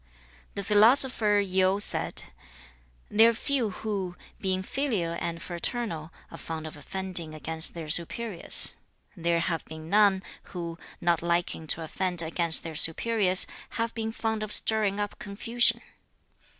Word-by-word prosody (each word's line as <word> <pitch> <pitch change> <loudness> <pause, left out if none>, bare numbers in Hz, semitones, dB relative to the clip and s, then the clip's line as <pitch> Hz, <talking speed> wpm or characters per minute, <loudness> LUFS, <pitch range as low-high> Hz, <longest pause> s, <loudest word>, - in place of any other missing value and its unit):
The 200 - -4
philosopher 215 0 +4
Yu 190 0 +1
said, - - 0 0.9
'They 225 +2 +5
are 230 - +2
few 250 -1 -1
who, 195 -2 -5 0.2
being 190 -1 -2
filial 205 -10 -2
and 170 -1 -4
fraternal, 170 -2 -5 0.2
are - - -10
fond 160 -1 -7
of 155 - -8
offending 175 0 0
against 160 +2 +1
their 165 -2 -7
superiors. 175 +5 +4 0.4
There 170 -1 0
have 165 -1 -2
been 160 +1 -10
none, 200 -2 +3 0.3
who, 170 -1 -6 0.2
not 170 -2 +1
liking 170 -1 -2
to 165 - +1
offend 175 +1 -1
against 165 0 +4
their 165 - -7
superiors, 185 +4 +2 0.3
have 230 0 -2
been 225 -1 -4
fond 220 -1 -3
of 215 -1 -5
stirring 210 -2 +1
up 205 -1 -5
confusion. 230 +2 +1
190 Hz, 135 wpm, -26 LUFS, 170-215 Hz, 0.9 s, They